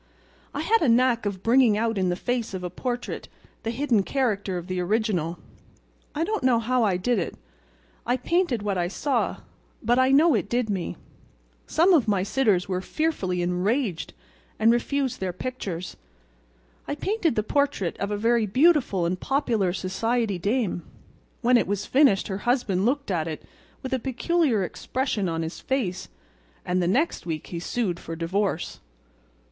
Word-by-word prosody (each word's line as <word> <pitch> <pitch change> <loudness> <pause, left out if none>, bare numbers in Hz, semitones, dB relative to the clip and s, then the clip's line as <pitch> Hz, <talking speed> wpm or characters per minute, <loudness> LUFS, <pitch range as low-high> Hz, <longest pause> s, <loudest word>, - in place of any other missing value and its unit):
I 285 - -1
had 450 +8 +3
a 300 - +3
knack 235 -2 +3
of 190 -2 -4
bringing 235 -2 +4
out 225 +1 0
in 185 -2 +1
the 175 - 0
face 235 0 -2
of 185 - -5
a 180 - -4
portrait 245 +5 -4 0.3
the 225 - -3
hidden 235 -2 +2
character 205 -5 -1
of 175 - -6
the 185 0 -3
original. 180 -4 0 0.8
I 310 - 0
don't 430 +1 -1
know 255 -2 +4
how 240 +2 +1
I 195 -4 +2
did 225 +4 +1
it—I - - -6
painted 275 - 0
what 200 -3 -1
I 175 - +1
saw—but 240 0 -2
I 260 0 +4
know 300 +4 +5
it 205 -3 0
did 240 -3 0
me. 185 -4 -3 0.7
Some 345 +4 +4
of 285 -9 +4
my 200 -3 +2
sitters 205 -4 +2
were 185 -1 -1
fearfully 190 - -1
enraged 180 - -1 0.4
and 225 +1 +5
refused 260 +2 0
their 190 -1 -2
pictures. 185 -5 -5 0.9
I 285 - -2
painted 350 - 0
the 215 - +1
portrait 280 - 0
of 200 - -2
a 205 - -1
very 230 +1 +2
beautiful 255 - +3
and 180 +2 -1
popular 235 -9 +1
society 200 +3 -1
dame. 205 -2 0 0.6
When 250 0 +5
it - - +1
was 205 +1 -2
finished 265 -8 +4
her 190 -1 -3
husband 215 -6 +1
looked 280 -3 -1
at 165 -3 0
it 155 -2 -5 0.4
with 260 - -3
a 260 - +1
peculiar 265 - +1
expression 215 0 -2
on 165 0 -2
his 160 - -5
face, 210 -9 -2 0.6
and 180 0 +1
the 175 - +1
next 265 - 0
week 155 -2 -3
he 170 - -2
sued 180 -1 -2
for 165 - -6
divorce." 175 +2 -2
220 Hz, 165 wpm, -25 LUFS, 185-255 Hz, 0.9 s, know